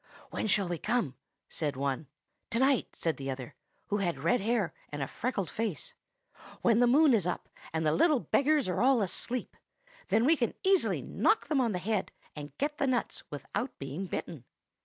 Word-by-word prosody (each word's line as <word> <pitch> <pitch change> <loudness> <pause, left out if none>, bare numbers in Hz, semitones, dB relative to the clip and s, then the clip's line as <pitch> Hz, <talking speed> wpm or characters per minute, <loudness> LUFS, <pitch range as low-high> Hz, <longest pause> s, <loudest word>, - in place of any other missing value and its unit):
"'When - - -2
shall 200 -2 +2
we 175 -2 -3
come?' 225 - 0 0.3
said 150 -4 -2
one. 140 +2 -2 0.4
"'To 230 - -1
night,' 265 0 +2
said 165 -2 -1
the 135 0 -5
other, 130 -2 -5 0.4
who 205 - +1
had 175 -4 0
red 245 - +2
hair 210 -6 0 0.2
and 145 -1 -3
a - - -3
freckled 225 -7 -2
face, 230 - -3 0.7
'when 230 -1 +4
the 245 - +5
moon 285 +3 +6
is 200 -6 +2
up, 180 - -3 0.2
and 160 0 -1
the 150 - +4
little 295 - +4
beggars 285 +1 +2
are 180 - 0
all 255 -3 +4
asleep. 235 +6 -3 0.5
Then 225 +2 +3
we 320 +4 +6
can 240 -6 -1
easily 385 -1 +3
knock 435 - +1
them 290 -4 +3
on 235 -3 +1
the - - 0
head, 195 +2 -1 0.2
and 145 -2 -8
get 295 +1 -2
the 280 - +2
nuts 250 -2 -1
without 205 - -4
being 140 +8 -5
bitten. 155 -7 -5
215 Hz, 190 wpm, -30 LUFS, 160-255 Hz, 0.7 s, moon